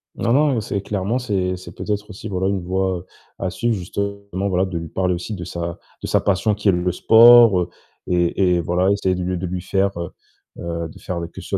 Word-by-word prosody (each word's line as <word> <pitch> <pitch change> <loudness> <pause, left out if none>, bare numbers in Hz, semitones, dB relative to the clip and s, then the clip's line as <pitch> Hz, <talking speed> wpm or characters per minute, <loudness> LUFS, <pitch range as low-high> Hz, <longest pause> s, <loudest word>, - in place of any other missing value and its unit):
Non 115 - 0
non, 145 -1 +3
heu, 110 - 0
c'est 100 -1 -3
clairement, 100 +4 -2
c'est 95 -6 -1
c'est 90 - -11
peut-être 105 0 -3
aussi, 105 +2 -8
voilà 95 -2 -1
une 100 -1 0
voie 95 0 -1 0.3
à 95 - -1
suivre 120 +5 -1
justement. 100 +1 -4
Voilà, 95 +1 +1
de 95 -2 -4
lui 85 0 -5
parler 90 +1 0
aussi 90 +5 -4
de 90 - -6
sa 85 0 -5 0.2
de - - -4
sa - - +2
passion 100 +2 +1
qui 105 0 +1
est - - +6
le 90 0 0
sport, 115 -2 +7
heu, 90 - -2 0.4
et 90 +1 +2
et 85 - +1
voilà 90 +4 +1
essayer 100 -2 +1
de 90 - -3
le 90 0 -1
de 90 - -4
lui 90 0 -3
faire, 95 +1 +1
heu 85 - -4 0.5
heu, 85 -1 -4
de - - -14
faire, 90 -2 -4
heu, 85 - -4
que 85 - -11
ce - - -11
soit - - 0
95 Hz, 245 wpm, -21 LUFS, 90-100 Hz, 0.5 s, sport